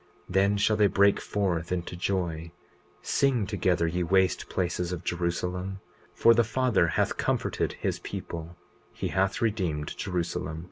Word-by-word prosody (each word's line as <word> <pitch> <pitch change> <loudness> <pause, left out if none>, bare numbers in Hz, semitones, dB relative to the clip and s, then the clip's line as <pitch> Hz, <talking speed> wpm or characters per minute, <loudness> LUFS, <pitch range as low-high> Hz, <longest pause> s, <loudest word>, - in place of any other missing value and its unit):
20:34 - - -7
Then 100 +2 +3
shall 105 +1 +2
they 105 -1 +5
break 100 +1 +3
forth 90 -5 -1
into 90 -1 -2
joy—Sing 90 - -2
together, 95 -4 +1
ye 85 +2 -1
waste 95 +2 +2
places 90 -1 -1
of 90 - -4
Jerusalem; 90 +2 -2 0.4
for 115 - +6
the 120 +1 +4
Father 115 -5 +2
hath 85 - 0
comforted - - -1
his - - -2
people, 85 +1 -6 0.4
he - - -4
hath 95 +5 0
redeemed 90 -9 -1
Jerusalem. 85 -4 -3
90 Hz, 140 wpm, -28 LUFS, 85-100 Hz, 0.4 s, for